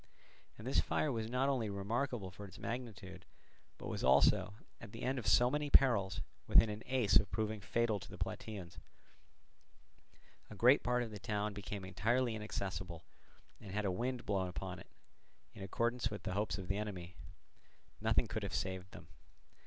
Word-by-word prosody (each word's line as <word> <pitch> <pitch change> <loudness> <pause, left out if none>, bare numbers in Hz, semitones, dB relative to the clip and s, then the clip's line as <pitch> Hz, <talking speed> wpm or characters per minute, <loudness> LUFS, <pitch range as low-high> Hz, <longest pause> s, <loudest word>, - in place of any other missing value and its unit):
And 110 - -10
this 130 - +2
fire 150 - 0
was 110 -2 -2
not 125 +3 +1
only 125 -6 +1
remarkable 105 +1 -2
for 100 +2 -9
its 95 +3 -13
magnitude, 100 -7 -6 0.5
but - - -9
was - - -3
also, 70 +9 +5 0.2
at 110 -3 -11
the 115 - -7
end 130 +1 0
of 115 - -5
so 120 +1 +5
many 150 0 -1
perils, 115 -10 +4 0.3
within 110 - +6
an 105 +1 -6
ace 125 -6 +4
of 100 - +2
proving 110 -1 -2
fatal 110 +2 +1
to - - -11
the - - -9
Plataeans; 95 -6 -5 1.7
a 105 - -9
great 125 +7 +6
part 125 0 +1
of 115 - -6
the 105 - -7
town 105 +1 -1
became 100 -1 -5
entirely 115 +5 +1
inaccessible, 95 -5 -4 0.6
and 95 -3 -9
had 105 +1 -1
a 95 - +2
wind 125 +6 -2
blown 95 -2 0
upon 90 -6 -5
it, - - -12 0.7
in - - -11
accordance 115 +5 0
with 105 -2 -6
the - - -3
hopes 105 +2 0
of 95 -3 -6
the 100 +1 0
enemy, 95 -5 -5 0.9
nothing - - +3
could - - -3
have - - -3
saved 95 0 -3
them. - - -11
105 Hz, 175 wpm, -36 LUFS, 95-120 Hz, 1.7 s, within